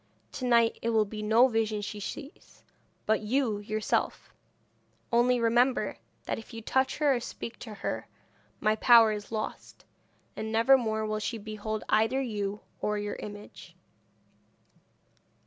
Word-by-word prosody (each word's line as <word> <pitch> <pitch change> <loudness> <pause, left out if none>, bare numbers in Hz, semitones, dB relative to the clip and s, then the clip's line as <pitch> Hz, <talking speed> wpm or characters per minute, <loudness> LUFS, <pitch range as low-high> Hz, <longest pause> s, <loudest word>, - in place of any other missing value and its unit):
To 255 - -5
night 235 -2 +3
it 230 - -1
will 220 -2 +3
be 215 +1 -7
no 220 +4 +5
vision 220 -3 0
she 205 0 -5
sees, 280 - -9 0.4
but 220 0 +2
you 220 -1 0
yourself; 215 +1 -2 0.8
only 245 +1 +4
remember, 240 +3 +2 0.3
that - - -2
if 225 +1 -12
you 225 - -6
touch 265 +3 +1
her 295 -2 +3
or 245 - 0
speak 230 -1 -7
to 220 -3 -8
her - - -4 0.5
my 215 0 +2
power 230 -1 +7
is 210 0 -6
lost, 215 -1 -5 0.5
and 220 0 -4
never 230 +5 +5
more 220 -4 0
will 215 0 -2
she 215 +2 -3
behold 215 0 -5
either 225 +5 +2
you 210 -5 -3 0.2
or 210 0 0
your 205 0 -4
image.' 205 0 -10
220 Hz, 145 wpm, -29 LUFS, 215-240 Hz, 0.8 s, power